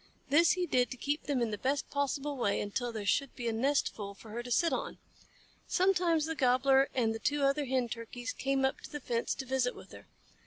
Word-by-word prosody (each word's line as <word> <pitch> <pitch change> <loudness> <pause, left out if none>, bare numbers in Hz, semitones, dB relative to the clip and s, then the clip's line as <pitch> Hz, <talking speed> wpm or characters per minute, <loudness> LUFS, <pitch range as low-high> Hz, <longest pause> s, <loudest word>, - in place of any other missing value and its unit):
This 330 +4 +6
he 365 -1 -1
did 250 -6 +2
to 255 - -7
keep 290 +5 -2
them 270 -4 +1
in 225 - -1
the 210 - -4
best 275 +2 0
possible 285 0 -1
way 220 -6 0
until 235 +4 -2
there 215 -3 -5
should 275 +6 +1
be 240 - -4
a 230 - 0
nestful 225 -5 0
for 215 +2 -13
her 235 +2 -3
to 245 - -9
sit 335 +7 +2
on. - - -3 0.7
Sometimes 355 -4 +2
the 325 - -2
Gobbler 270 -1 +3
and 230 -4 +2
the 225 - -5
two 290 +4 0
other 275 +1 +2
Hen 255 -2 0
Turkeys 235 +2 -6
came 270 0 0
up 265 - -1
to - - -9
the 295 - -4
fence 235 -3 -1
to 265 - -5
visit 260 -1 0
with - - -13
her. - - -13
265 Hz, 230 wpm, -31 LUFS, 235-285 Hz, 0.7 s, This